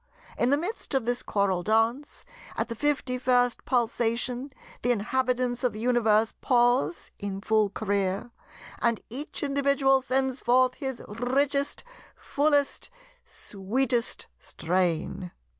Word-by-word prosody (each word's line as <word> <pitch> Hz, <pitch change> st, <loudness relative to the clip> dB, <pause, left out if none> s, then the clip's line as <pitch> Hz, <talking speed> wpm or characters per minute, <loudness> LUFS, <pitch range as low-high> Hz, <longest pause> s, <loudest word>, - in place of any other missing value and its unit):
In 240 Hz, -, +1 dB
the 285 Hz, -, +4 dB
midst 350 Hz, -2 st, -4 dB
of 260 Hz, -4 st, +1 dB
this 245 Hz, 0 st, -1 dB
choral 195 Hz, -3 st, 0 dB
dance, 225 Hz, +8 st, 0 dB, 0.3 s
at 225 Hz, +1 st, -1 dB
the -, -, -2 dB
fifty 265 Hz, -1 st, -1 dB
first 245 Hz, -1 st, +2 dB
pulsation, 245 Hz, +2 st, -1 dB, 0.3 s
the 245 Hz, -, 0 dB
inhabitants 245 Hz, +2 st, 0 dB
of 245 Hz, -4 st, +1 dB
the 215 Hz, -, -7 dB
Universe 225 Hz, -2 st, +2 dB
pause 240 Hz, -, +2 dB
in 200 Hz, -1 st, -4 dB
full 215 Hz, 0 st, +2 dB
career, 200 Hz, +1 st, -2 dB, 0.5 s
and 235 Hz, -2 st, +1 dB
each 285 Hz, +5 st, -5 dB
individual 275 Hz, -1 st, +2 dB
sends 265 Hz, 0 st, -1 dB
forth 255 Hz, +1 st, +3 dB
his 265 Hz, -3 st, -5 dB
richest, 275 Hz, +6 st, -1 dB, 0.3 s
fullest, 285 Hz, -1 st, 0 dB, 0.4 s
sweetest 235 Hz, +5 st, -2 dB
strain. 175 Hz, +1 st, -1 dB
245 Hz, 120 wpm, -27 LUFS, 215-265 Hz, 0.5 s, the